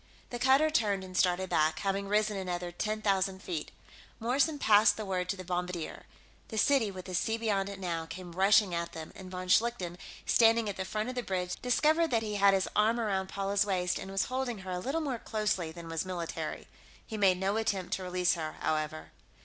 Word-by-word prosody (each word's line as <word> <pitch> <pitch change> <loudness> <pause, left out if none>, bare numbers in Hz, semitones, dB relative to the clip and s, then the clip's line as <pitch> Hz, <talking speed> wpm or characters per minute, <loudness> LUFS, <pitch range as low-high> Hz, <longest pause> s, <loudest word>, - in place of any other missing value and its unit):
The 240 - -4
cutter 270 +5 +4
turned 205 -8 +1
and 185 -1 -10
started 185 0 +2
back, 155 +1 +2
having 195 0 -1
risen 210 +1 +1
another 180 -2 -3
ten 215 +5 -3
thousand 195 -1 +1
feet. 160 -4 -4 0.5
Morrison 275 +7 +1
passed 210 -5 +5
the 215 - -4
word 180 -2 -2
to 200 - 0
the 185 - -7
bombardier. 180 -2 -4 0.4
The 220 - -6
city, 250 -1 +3
with 185 -2 -8
the 185 - -7
sea 225 +5 0
beyond 200 -4 0
it 200 -1 -7
now, 165 -3 -3
came 175 +2 -8
rushing 195 +1 +4
at 170 0 -3
them, 160 -1 -7
and 190 -1 -9
von 185 0 -6
Schlichten, 185 -4 +2 0.3
standing 230 -1 +4
at 200 - -3
the 190 - -3
front 215 +4 -2
of - - -4
the 250 - -2
bridge, 180 -4 -2
discovered 310 +7 +3
that 230 -4 +1
he 210 -1 -3
had 200 -1 +5
his 190 - 0
arm 220 +3 +3
around 195 -4 -1
Paula's 200 +1 +1
waist 180 -3 0
and - - -7
was 195 0 0
holding 255 -2 -2
her 185 - -5
a 180 - -2
little 275 - -2
more 270 -6 -2
closely 210 -8 -1
than 170 0 -9
was 165 -1 -2
military. 180 -3 -5 0.4
He 220 - -6
made 195 -3 +4
no 195 +3 0
attempt 195 -5 -1
to 190 - -2
release 180 -1 +1
her, 155 -3 -4
however. 155 0 -2
195 Hz, 215 wpm, -31 LUFS, 180-220 Hz, 0.5 s, passed